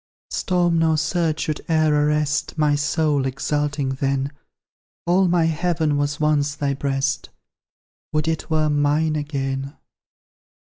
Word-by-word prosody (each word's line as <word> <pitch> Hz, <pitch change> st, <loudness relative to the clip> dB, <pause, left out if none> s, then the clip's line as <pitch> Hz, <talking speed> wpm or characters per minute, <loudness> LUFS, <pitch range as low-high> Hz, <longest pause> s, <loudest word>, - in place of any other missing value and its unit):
Storm 175 Hz, -3 st, +1 dB
nor 160 Hz, -1 st, +3 dB
surge 155 Hz, 0 st, 0 dB
should 155 Hz, -3 st, -2 dB
e'er 155 Hz, -1 st, +3 dB
arrest 150 Hz, +1 st, +1 dB
My 150 Hz, -1 st, +3 dB
soul, 145 Hz, -1 st, +1 dB
exalting 145 Hz, +1 st, -1 dB
then: 135 Hz, +1 st, -1 dB, 0.7 s
All 185 Hz, +2 st, +3 dB
my 175 Hz, -1 st, +3 dB
heaven 160 Hz, -2 st, 0 dB
was 145 Hz, +1 st, -1 dB
once 150 Hz, -1 st, +1 dB
thy 140 Hz, -2 st, -1 dB
breast, 135 Hz, 0 st, -1 dB, 0.8 s
Would 155 Hz, 0 st, 0 dB
it 160 Hz, +1 st, -2 dB
were 155 Hz, -1 st, +2 dB
mine 150 Hz, +2 st, +2 dB
again! 140 Hz, -2 st, -3 dB
150 Hz, 125 wpm, -22 LUFS, 145-160 Hz, 0.8 s, nor